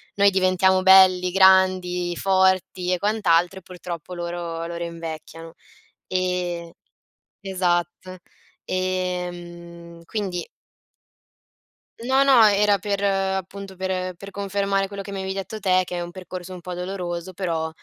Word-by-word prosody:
noi 200 0 +5
diventiamo 185 0 +3
belli, 185 -1 +6
grandi, 185 -2 +3
forti 185 -1 +1
e - - +1
quant'altro 190 -3 +1
e - - -21
purtroppo 175 -1 -8
loro 170 -1 -4
loro 170 0 -5
invecchiano 165 -1 -8 0.5
e 180 -2 -2 0.7
esatto. 185 -1 -2 0.5
Ehm, 175 -2 -4
quindi 185 -3 -4 1.6
No, 265 +3 +3
no, 260 -5 +6
era 205 0 +4
per 200 +1 -3
appunto 195 0 -2
per 185 -1 -3
per 195 +3 -11
confermare 200 0 -1
quello 200 0 -7
che 200 - -8
mi 200 - -5
avevi 190 0 -3
detto 195 +3 -6
te, 185 -2 +3
che 180 - -5
è - - -3
un 175 0 -6
percorso 185 0 -8
un 180 - -9
po' 180 +1 -6
doloroso 180 -1 -5
però 165 -3 -2
185 Hz, 130 wpm, -23 LUFS, 175-195 Hz, 1.6 s, belli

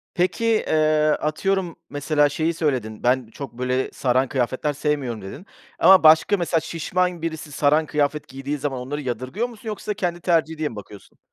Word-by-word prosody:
Peki, 185 +6 0
eee, 155 -8 +2
atıyorum, 180 +3 -1
mesela 145 0 +1
şeyi 160 +3 -1
söyledin: 130 -10 -2
Ben 125 0 +2
çok, 120 +2 -9
böyle, 125 +2 -1
saran 130 +1 +1
kıyafetler 130 +3 -1
sevmiyorum, 140 -6 -2
dedin 95 - -9 0.3
ama 185 +1 +7
başka, 160 +6 +6
mesela 170 -2 0
şişman 175 +2 -2
birisi 160 -2 -5
saran 150 +2 +2
kıyafet 150 0 -1
giydiği 135 +2 -4
zaman 135 -2 -3
onları 140 +4 -4
yadırgıyor 130 - -3
musun 225 -1 -13
yoksa 210 0 -4
kendi 175 -3 -2
tercihi 160 -2 +1
diye 155 -1 -1
mi - - -10
bakıyorsun? 105 -1 -12
150 Hz, 165 wpm, -23 LUFS, 130-170 Hz, 0.3 s, ama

